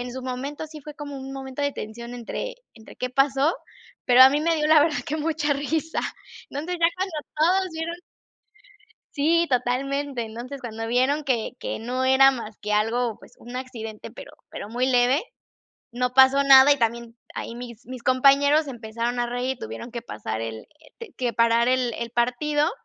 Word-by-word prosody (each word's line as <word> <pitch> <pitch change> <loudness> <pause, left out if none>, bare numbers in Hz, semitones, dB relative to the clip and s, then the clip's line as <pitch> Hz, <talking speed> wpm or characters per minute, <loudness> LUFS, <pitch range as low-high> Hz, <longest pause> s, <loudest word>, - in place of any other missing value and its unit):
en 245 0 -5
su 260 - -6
momento 270 +4 -5
sí 310 0 -11
fue 300 +1 -10
como 290 -1 -7
un 270 0 -7
momento 270 +1 -6
de 285 - +1
tensión 235 +2 -7
entre - - -5 0.2
entre 220 -1 -15
qué 255 - -3
pasó, 275 +4 +2 0.5
pero 250 0 +7
a 260 - +9
mí 290 +2 +1
me 330 +1 +1
dio, 300 - +1
la 310 0 +6
verdad, 300 0 +2
que 305 - -2
mucha 305 -1 0
risa. 305 +3 -2 0.5
Entonces, 320 +6 -4
ya 335 - +6
cuando 380 -2 -3 0.2
todos 370 +5 +3
vieron 325 +1 -4 1.2
Sí, 330 +4 +3
totalmente. 265 +1 -1
Entonces, 240 +5 -8
cuando 225 -1 -5
vieron 260 +5 +1
que 240 -5 0
que - - -4
no 250 +3 -2
era 270 +1 +6
más 225 -4 -7
que 210 +1 -3
algo, 225 +2 +1
pues, - - -17
un 245 +2 -7
accidente, 225 -5 -7
pero - - -11 0.2
pero 205 - -7
muy 245 +3 0
leve, 250 +4 +3 0.7
no 250 +1 -1
pasó 265 +1 +6
nada 270 +1 +8
y 285 - 0
también 235 0 -2 0.2
ahí 230 - -6
mis 240 -2 -9
mis 255 -1 -9
compañeros 280 +4 +4
se 275 - -5
empezaron 235 +1 -4
a 240 - +1
reír 250 +2 -2
y - - -28
tuvieron 115 - -7
que 235 0 -6
pasar 110 +1 -5
el, 115 -1 -5 0.2
eh, 315 - -21
te 460 -5 -10
que 245 -2 -1
parar 230 0 +3
el 255 -1 +1
el 235 -1 -5
partido, 270 +5 +1
260 Hz, 190 wpm, -24 LUFS, 235-290 Hz, 1.2 s, a